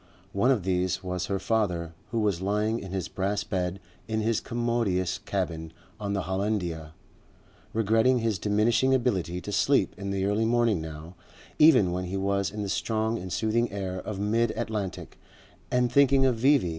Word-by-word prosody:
One 100 Hz, +6 st, +2 dB
of 125 Hz, -8 st, +2 dB
these 90 Hz, 0 st, 0 dB
was 90 Hz, -1 st, -3 dB
her 100 Hz, -, 0 dB
father, 90 Hz, -7 st, -1 dB, 0.2 s
who 115 Hz, -1 st, -1 dB
was 100 Hz, -5 st, 0 dB
lying 105 Hz, +3 st, 0 dB
in 95 Hz, -, -8 dB
his 95 Hz, -2 st, -2 dB
brass 100 Hz, +2 st, -1 dB
bed 90 Hz, -2 st, -2 dB, 0.3 s
in 110 Hz, 0 st, -1 dB
his 110 Hz, 0 st, +1 dB
commodious 115 Hz, -7 st, -1 dB
cabin 85 Hz, -5 st, -3 dB, 0.3 s
on 100 Hz, -1 st, -2 dB
the 100 Hz, -2 st, -1 dB
Hollandia, 90 Hz, -5 st, -2 dB, 0.8 s
regretting 115 Hz, +4 st, +3 dB
his 115 Hz, -4 st, 0 dB
diminishing 115 Hz, +5 st, +2 dB
ability 95 Hz, -9 st, -1 dB
to 105 Hz, -, -6 dB
sleep 105 Hz, +8 st, +2 dB
in 100 Hz, 0 st, -4 dB
the 95 Hz, -1 st, -1 dB
early 105 Hz, +3 st, +1 dB
morning 115 Hz, -5 st, +2 dB
now, 80 Hz, +2 st, -8 dB, 0.5 s
even 130 Hz, -, +6 dB
when 90 Hz, +1 st, -2 dB
he 95 Hz, +2 st, -3 dB
was 100 Hz, 0 st, 0 dB
in 105 Hz, +1 st, -5 dB
the 100 Hz, -, -4 dB
strong 110 Hz, +2 st, -1 dB
and 90 Hz, 0 st, -7 dB
soothing 115 Hz, +3 st, 0 dB
air 95 Hz, -2 st, -4 dB
of 100 Hz, +1 st, -5 dB
mid 115 Hz, +3 st, +1 dB
Atlantic, 105 Hz, -4 st, -4 dB, 0.5 s
and 125 Hz, -1 st, +1 dB
thinking 135 Hz, 0 st, +5 dB
of 130 Hz, -2 st, +3 dB
V.V. 130 Hz, -5 st, +3 dB
100 Hz, 170 wpm, -27 LUFS, 95-115 Hz, 0.8 s, even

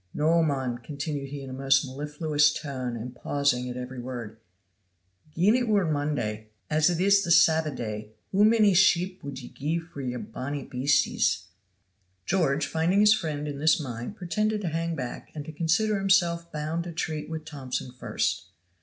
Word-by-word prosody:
Noo, 165 Hz, +3 st, +3 dB
mon," 135 Hz, -6 st, -1 dB
continued 140 Hz, +2 st, -5 dB
he 140 Hz, 0 st, -6 dB
in 135 Hz, -, -8 dB
a -, -, -5 dB
most 135 Hz, +1 st, +3 dB
mellifluous 150 Hz, +2 st, +1 dB
tone 130 Hz, -5 st, -4 dB
and 125 Hz, +2 st, -7 dB
pausing 125 Hz, -2 st, 0 dB
at 125 Hz, -, -5 dB
every 125 Hz, 0 st, -6 dB
word, 120 Hz, -3 st, -6 dB, 1.0 s
"gien 190 Hz, +6 st, +4 dB
it 250 Hz, -1 st, +1 dB
were 205 Hz, -4 st, +3 dB
Monday 145 Hz, -9 st, -2 dB, 0.2 s
as 155 Hz, +2 st, +4 dB
it 170 Hz, -1 st, -1 dB
is 200 Hz, +1 st, +4 dB
the 170 Hz, -, -4 dB
Sabba 160 Hz, -1 st, +5 dB
day 110 Hz, -5 st, -5 dB, 0.2 s
hoo 195 Hz, +2 st, +4 dB
mony 215 Hz, -2 st, +5 dB
sheep 185 Hz, 0 st, +3 dB
wud 140 Hz, -2 st, -6 dB
ye 125 Hz, -2 st, -8 dB
gie 155 Hz, +4 st, -2 dB
for 165 Hz, -4 st, -8 dB
yon 125 Hz, -1 st, -4 dB
bonnie 135 Hz, +5 st, -5 dB
beasties?" 130 Hz, -5 st, +1 dB, 0.8 s
George, 150 Hz, -, +1 dB
finding 165 Hz, +5 st, +1 dB
his 210 Hz, 0 st, +7 dB
friend 150 Hz, -7 st, -3 dB
in 145 Hz, -1 st, -5 dB
this 155 Hz, +1 st, +4 dB
mind, 120 Hz, -, -5 dB
pretended 210 Hz, +3 st, -1 dB
to 180 Hz, -, -2 dB
hang 165 Hz, +1 st, -2 dB
back 125 Hz, -5 st, -6 dB
and 150 Hz, -2 st, -5 dB
to 160 Hz, -, -7 dB
consider 175 Hz, +7 st, +1 dB
himself 175 Hz, -3 st, +2 dB
bound 155 Hz, +2 st, -2 dB
to 175 Hz, -, -5 dB
treat 160 Hz, -2 st, -3 dB
with 160 Hz, -1 st, -5 dB
Thomson 130 Hz, -4 st, -5 dB
first. 125 Hz, -, -2 dB
150 Hz, 175 wpm, -27 LUFS, 130-170 Hz, 1.0 s, his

